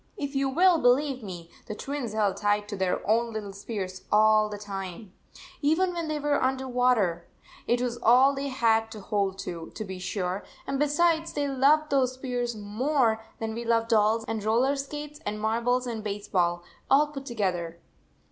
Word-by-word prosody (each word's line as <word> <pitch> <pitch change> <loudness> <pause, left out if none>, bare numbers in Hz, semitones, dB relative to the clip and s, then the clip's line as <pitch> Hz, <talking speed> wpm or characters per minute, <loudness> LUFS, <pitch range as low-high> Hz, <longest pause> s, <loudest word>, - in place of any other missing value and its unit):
If 285 -5 -4
you 275 0 +1
will 345 +4 +4
believe 260 +1 +2
me, 175 -5 -8 0.2
the 215 - -5
Twins 270 -3 -4
held 205 -3 +1
tight 205 0 +1
to - - -4
their 190 -2 -1
own 230 +2 +2
little 210 -3 -5
spears 195 -2 -5
all 215 0 +5
the 205 - -5
time, 195 -1 -7 0.5
even 335 +5 +2
when 335 -2 -3
they 310 -1 -1
were 290 0 +1
under 260 0 0
the - - -6
water! 235 -9 +1 0.4
It 240 0 +2
was 240 -1 -2
all 255 +4 +6
they 275 +1 -3
had 225 -4 +2
to 215 - -8
hold 195 -1 -1
to, 165 -2 -6
to 215 - -4
be 190 -1 -7
sure, 185 0 -3 0.2
and 275 0 -2
besides, 320 +3 +2
they 290 -1 -1
loved 280 +3 +3
those 260 -2 +2
spears 245 -2 -3
more 225 +3 +1 0.2
than 225 - -3
77 - - -6
we 235 - -4
love 230 -1 +2
dolls 220 0 +3
and 220 -2 -3
roller 240 +6 +2
skates 295 +2 -6
and 210 +1 -3
marbles 235 +4 +1
and 230 -3 -4
baseball, 185 -4 -1 0.3
all 285 +2 +6
put 275 -2 -8
together. 180 -7 -2
230 Hz, 185 wpm, -27 LUFS, 205-275 Hz, 0.5 s, all